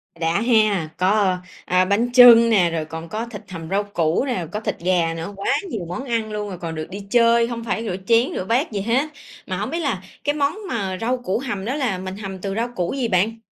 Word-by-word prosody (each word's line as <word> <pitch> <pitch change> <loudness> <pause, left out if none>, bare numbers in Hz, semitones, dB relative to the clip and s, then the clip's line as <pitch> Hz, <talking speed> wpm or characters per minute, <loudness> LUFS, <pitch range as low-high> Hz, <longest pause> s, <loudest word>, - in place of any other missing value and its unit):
Đã 165 +5 0
he! 215 -8 +3
Có, 190 0 +2 0.3
a, 185 +1 +3
bánh 225 +5 +1
chưng 235 -2 +9
nè, 185 -6 +4
rồi 160 -1 -2
còn 160 +1 -8
có 220 +2 -3
thịt 220 -3 -9
hầm 165 -2 -7
rau 200 +2 +1
củ 175 0 0
nè, 190 -11 -2
có 210 - -3
thịt - - -4
gà 170 -2 +1
nữa, 165 +5 -6
quá 200 +7 0 0.2
nhiều 195 - -4
món 255 +10 -5
ăn 225 -3 -2
luôn, 205 -3 -4
còn 165 -1 -4
được 155 0 -5
đi 195 +2 -6
chơi, 235 0 +4
hông 230 -1 -5
phải 230 0 -2
rửa 190 -5 -3
chén, 235 +2 +4
rửa 185 - -3
bát 240 - +1
gì 200 -2 -2
hết. 245 +8 +1 0.4
Mà 185 -2 -3
hổng 210 +5 -3
biết 335 +3 -2
là 275 - -1 0.2
cái 290 +1 0
món 290 +6 0
mà 195 -6 -2
rau 250 +3 0
củ 240 -3 -2
hầm 210 -7 -4
đó 255 - -1
là 250 -10 -1
mình 190 +1 -6
hầm 195 -2 -6
từ 195 0 -3
rau 230 +2 0
củ 175 +4 -1
gì 260 -4 -1
bạn? 215 +4 +1
210 Hz, 245 wpm, -22 LUFS, 185-235 Hz, 0.4 s, chưng